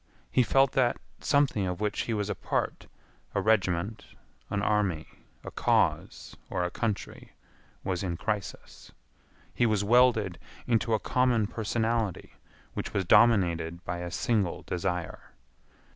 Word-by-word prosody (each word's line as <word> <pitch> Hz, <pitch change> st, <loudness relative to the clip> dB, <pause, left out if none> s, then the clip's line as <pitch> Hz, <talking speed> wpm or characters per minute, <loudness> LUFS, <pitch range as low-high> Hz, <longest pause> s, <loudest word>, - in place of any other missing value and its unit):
He -, -, +4 dB
felt 135 Hz, +3 st, +3 dB
that 130 Hz, -3 st, +2 dB, 0.2 s
something 140 Hz, -9 st, +2 dB
of 90 Hz, 0 st, -3 dB
which 105 Hz, -1 st, -1 dB
he -, -, +1 dB
was 105 Hz, -2 st, -1 dB
a 105 Hz, -, -1 dB
part—a -, -, -5 dB
regiment, 100 Hz, -1 st, +1 dB, 0.5 s
an 100 Hz, 0 st, -1 dB
army, 100 Hz, -8 st, +1 dB, 0.4 s
a -, -, -7 dB
cause, -, -, 0 dB
or 90 Hz, -, -1 dB
a 90 Hz, -, -2 dB
country—was 100 Hz, -4 st, -5 dB
in 90 Hz, -4 st, -3 dB
crisis. 105 Hz, 0 st, -5 dB, 0.6 s
He 120 Hz, -, +2 dB
was 105 Hz, -2 st, +1 dB
welded 110 Hz, -5 st, +3 dB, 0.3 s
into 115 Hz, -1 st, +2 dB
a -, -, -1 dB
common 125 Hz, -3 st, +2 dB
personality 110 Hz, -1 st, -2 dB, 0.4 s
which -, -, -5 dB
was 95 Hz, -2 st, +1 dB
dominated 85 Hz, -5 st, +3 dB
by 90 Hz, -, -3 dB
a 90 Hz, 0 st, -4 dB
single 110 Hz, -3 st, 0 dB
desire. 90 Hz, -1 st, -4 dB
105 Hz, 130 wpm, -28 LUFS, 90-115 Hz, 0.6 s, He